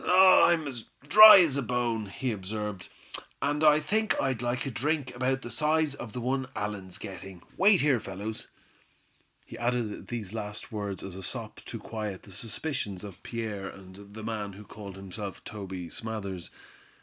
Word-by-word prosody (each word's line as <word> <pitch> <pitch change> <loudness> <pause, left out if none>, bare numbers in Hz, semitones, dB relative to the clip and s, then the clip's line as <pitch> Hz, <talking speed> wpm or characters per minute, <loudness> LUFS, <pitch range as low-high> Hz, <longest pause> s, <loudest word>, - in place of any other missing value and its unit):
"I'm 180 -3 +6
as 120 -5 -5 0.2
dry 215 +1 +11
as 150 -6 +2
a - - +1
bone," 120 -3 -1
he 125 +6 -3
observed, 105 -1 -5 0.5
"and 145 +3 0
I 150 0 +7
think 215 +8 0
I'd 130 -4 0
like 120 +1 -1
a 135 - -3
drink 140 +1 -1
about 130 +1 0
the 120 - -6
size 155 -1 +1
of 120 -6 -8
the 125 - -4
one 130 +2 -1
Allan's 100 -3 -4
getting. 95 -3 -9
Wait 195 -1 +5
here, 140 -4 +3
fellows." 100 +3 -6 1.0
He 115 - -10
added 120 -3 -1
these 110 -5 -5
last 105 +2 -6
words 100 -3 -4
as 95 - -6
a 95 - -7
sop 90 - -3
to - - -6
quiet 105 -4 -5
the 100 - -13
suspicions 105 - -2
of 100 -3 -10
Pierre 105 -4 -4
and 100 +2 -13
the 110 - -7
man 105 -3 -4
who 100 +3 -11
called 100 -2 -10
himself 95 +1 -7
Toby 95 -4 -7
Smathers. 100 -6 -5
110 Hz, 170 wpm, -29 LUFS, 100-135 Hz, 1.0 s, dry